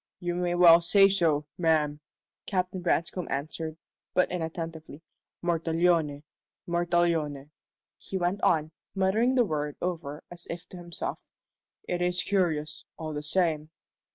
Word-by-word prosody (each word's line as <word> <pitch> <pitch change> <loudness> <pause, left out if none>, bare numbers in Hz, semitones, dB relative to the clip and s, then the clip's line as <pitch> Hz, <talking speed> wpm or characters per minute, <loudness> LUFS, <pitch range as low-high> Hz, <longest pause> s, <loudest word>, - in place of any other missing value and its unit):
"You 175 0 -2
may 175 0 0
well 170 -1 +8
say 195 +4 +6
so, 165 -6 +2
ma'am," 155 -3 +2 0.5
Captain 185 -1 -1
Branscome 175 0 0
answered, 155 +3 -4 0.4
but 180 - +3
inattentively. 165 -2 -5 0.4
"Mortallone 165 -3 +1 0.4
Mortallone," 170 -4 0 0.5
he 190 - -4
went 185 +2 -1
on, 155 -1 +2 0.2
muttering 215 +7 +2
the 245 -2 +4
word 150 -4 -2
over 160 -4 -4
as 175 0 -8
if 170 +1 -6
to 180 - -10
himself. 170 -1 -5 0.7
"It 175 0 -1
is 180 0 +1
curious, 165 -5 0
all 155 -1 -5
the 150 - -3
same." 155 -1 0
170 Hz, 125 wpm, -28 LUFS, 155-180 Hz, 0.7 s, well